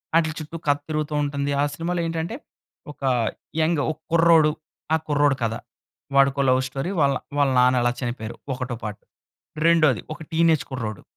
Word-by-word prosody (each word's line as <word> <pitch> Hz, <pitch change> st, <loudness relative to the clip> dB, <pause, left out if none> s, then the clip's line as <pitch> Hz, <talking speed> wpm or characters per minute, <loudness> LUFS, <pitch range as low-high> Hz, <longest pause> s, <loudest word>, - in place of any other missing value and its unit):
ఆటిల 160 Hz, -2 st, +3 dB
చుట్టూ 155 Hz, +2 st, -7 dB
కథ 145 Hz, 0 st, +4 dB
తిరుగుతూ 155 Hz, -1 st, -2 dB
ఉంటుంది. 140 Hz, 0 st, -2 dB
ఆ -, -, +3 dB
సినిమాలో 170 Hz, +3 st, -2 dB
ఏంటంటే 165 Hz, +6 st, -3 dB, 0.6 s
ఒక 145 Hz, -, -15 dB, 0.6 s
యంగ్ 155 Hz, -2 st, +2 dB
ఒక 155 Hz, -, -8 dB
కుర్రోడు, 165 Hz, -2 st, +5 dB, 0.4 s
ఆ -, -, +6 dB
కుర్రోడు 145 Hz, -2 st, +3 dB
కథ. 110 Hz, 0 st, 0 dB, 0.6 s
వాడికో 140 Hz, 0 st, +4 dB
లవ్ 130 Hz, 0 st, +4 dB
స్టోరీ 135 Hz, +8 st, -4 dB
వాళ్ళ, 140 Hz, -2 st, +3 dB, 0.2 s
వాళ్ళ 145 Hz, -1 st, +3 dB
నాన్న 125 Hz, 0 st, +4 dB
ఎలా 120 Hz, 0 st, +2 dB
చనిపోయారు? 120 Hz, -2 st, -4 dB, 0.2 s
ఒకటో 125 Hz, -1 st, -4 dB
పార్ట్. 105 Hz, -1 st, -5 dB, 0.6 s
రెండోది 155 Hz, -8 st, +4 dB
ఒక 155 Hz, -, -12 dB
టీనేజ్ 160 Hz, -2 st, +3 dB
కుర్రోడు, 110 Hz, -6 st, -5 dB
145 Hz, 155 wpm, -23 LUFS, 130-160 Hz, 0.6 s, ఆ